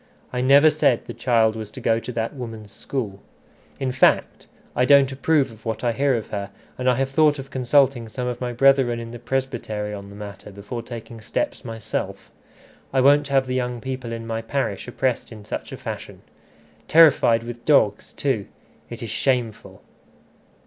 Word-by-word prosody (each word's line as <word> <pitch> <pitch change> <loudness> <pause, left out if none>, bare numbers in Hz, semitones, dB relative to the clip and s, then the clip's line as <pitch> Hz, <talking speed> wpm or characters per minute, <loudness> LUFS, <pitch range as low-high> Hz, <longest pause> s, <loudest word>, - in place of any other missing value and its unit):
I 125 - -1
never 140 +4 +6
said 140 -6 +2
the - - -7
child 115 -3 +2
was 110 -2 -6
to - - -10
go 115 0 +2
to 125 - -7
that 115 +1 -2
woman's 115 -6 -8
school. 105 -5 -5 0.6
In 135 -2 -1
fact 130 - +2 0.3
I 125 - +3
don't 140 0 +6
approve 140 0 +1
of 110 0 -16
what 110 0 -4
I 120 - +2
hear 135 +2 +1
of 115 - -4
her, 100 -1 -4 0.3
and 130 0 0
I 125 - +3
have 135 +1 -1
thought 150 +1 +4
of 135 0 -9
consulting 130 -2 +2
some 125 +2 -4
of 125 0 -4
my 125 -1 -2
brethren 130 -1 +3
in 115 0 -7
the 120 - -8
presbytery 120 -4 -3
on 100 -1 -8
the 100 - -12
matter 105 -1 -9
before 105 +4 -7
taking 115 -1 -9
steps 295 - -3
myself. 115 -3 -5 0.6
I 135 - +2
won't 145 +2 +5
have 135 -1 +2
the 130 - -3
young 125 -1 -2
people 130 -2 -5
in 115 0 -5
my 115 0 -3
parish 115 -4 -3
oppressed 125 0 -1
in 105 -2 -11
such - - -5
a - - -6
fashion. - - -7 0.6
Terrified 145 -8 +5
with 120 0 -8
dogs 110 -9 +3
too! 130 -8 -1 0.4
It 120 +1 -7
is 115 - -5
shameful." 120 -2 -2
120 Hz, 185 wpm, -23 LUFS, 115-135 Hz, 0.6 s, never